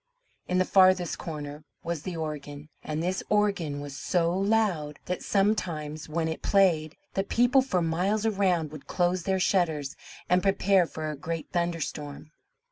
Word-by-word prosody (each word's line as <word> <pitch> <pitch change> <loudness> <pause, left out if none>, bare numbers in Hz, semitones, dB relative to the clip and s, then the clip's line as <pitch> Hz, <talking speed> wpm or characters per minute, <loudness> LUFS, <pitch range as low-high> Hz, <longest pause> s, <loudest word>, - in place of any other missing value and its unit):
In 180 - 0
the 185 - +3
farthest 185 -3 +4
corner 150 -2 -6 0.2
was 170 -3 -3
the 175 +1 -5
organ; 150 -1 -6
and 155 +1 -3
this 185 +2 -1
organ 195 -9 +1
was 145 -1 -7
so 170 +4 +1
loud, 195 -7 +1
that 180 0 -3
sometimes 165 -7 -1
when 160 +1 -1
it 160 - -4
played, 170 -6 +2 0.2
the 195 - 0
people 245 +6 +3
for 185 -10 0
miles 185 +7 0
around 185 -7 +1
would 155 -2 -10
close 180 0 +1
their 190 -1 +1
shutters 160 -7 +1 0.3
and 180 +1 +3
prepare 195 -2 +3
for 155 -1 -4
a - - -5
great 160 +3 -5
thunderstorm. 160 -4 -3
170 Hz, 155 wpm, -27 LUFS, 155-190 Hz, 0.3 s, farthest